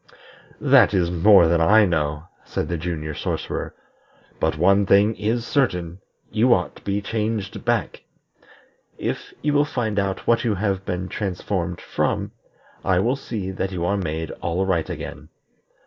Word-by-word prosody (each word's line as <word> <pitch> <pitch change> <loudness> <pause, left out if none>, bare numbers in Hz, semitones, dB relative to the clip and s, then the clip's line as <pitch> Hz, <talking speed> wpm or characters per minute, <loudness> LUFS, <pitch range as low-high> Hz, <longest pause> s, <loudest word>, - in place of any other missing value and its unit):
"That - - +5
is 85 -2 +1
more 90 0 +6
than 85 0 +2
I 105 +6 +6
know," 75 -4 -1 0.2
said - - -4
the 85 - -1
Junior 80 -2 -4
Sorcerer. - - -4 0.6
"But 80 -1 0
one 100 +4 +4
thing 105 +3 +4
is 115 +2 -1
certain 90 - 0 0.3
you 120 +3 +4
ought 90 - -3
to - - -16
be 100 +1 -2
changed 110 -2 -3
back. - - -1 1.0
If - - -4
you 150 0 +1
will 145 0 +4
find 115 -8 -1
out 95 -1 -2
what 115 0 +3
you 110 -4 +1
have 95 -1 -1
been 90 0 -2
transformed 90 -3 -3
from, - - -2 0.5
I 95 -2 +2
will 120 +8 +2
see 110 -8 -5
that 95 0 -3
you 85 -2 -2
are 100 +3 +1
made 80 -4 -3
all 85 +3 -1
right 90 -4 0
again. 75 +1 -7
95 Hz, 160 wpm, -23 LUFS, 85-105 Hz, 1.0 s, more